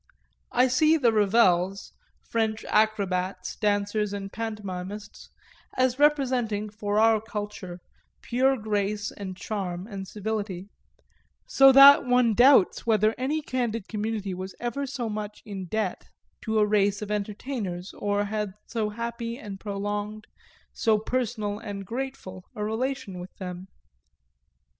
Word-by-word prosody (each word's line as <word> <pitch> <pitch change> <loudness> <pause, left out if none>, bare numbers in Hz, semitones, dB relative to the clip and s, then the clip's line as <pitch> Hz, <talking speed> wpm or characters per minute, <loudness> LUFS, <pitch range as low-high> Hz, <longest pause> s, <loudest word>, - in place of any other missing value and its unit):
I 250 +1 +4
see 310 +6 +4
the 240 -6 +3
Ravels, 195 -3 +2 0.4
French 220 -1 0
acrobats, 190 -4 0
dancers 205 0 0
and 195 -1 -6
pantomimists, 205 -2 -6 0.5
as 255 0 +2
representing, 250 -8 +2
for 205 -1 -2
our 220 -1 +4
culture, 205 -5 -6 0.4
pure 265 +2 +2
grace 210 -1 -1
and 190 -2 -7
charm 185 -4 -4
and 195 -3 -7
civility; 205 -3 -4 0.8
so 270 0 +7
that 275 +1 +9
one 250 -2 +3
doubts 245 -2 +5
whether 215 -1 +3
any 295 +4 -1
candid 235 -6 -2
community 210 -2 -3
was 185 +1 -6
ever 275 +4 -3
so 255 -3 -3
much 210 -1 -5
in 195 -3 -6
debt 220 +4 -3 0.4
to 220 -1 0
a 210 - +5
race 205 0 +1
of 210 - -6
entertainers 205 -3 -4
or 205 0 -1
had 210 -1 -3
so 220 -3 -2
happy 235 +1 -4
and 205 -7 -8
prolonged, 205 +1 -4 0.5
so 220 -1 +2
personal 215 -2 -2
and 205 -3 -6
grateful 230 -6 -6
a 210 - -3
relation 220 -3 -3
with 180 +1 -10
them. 180 0 -7
210 Hz, 130 wpm, -26 LUFS, 200-235 Hz, 0.8 s, that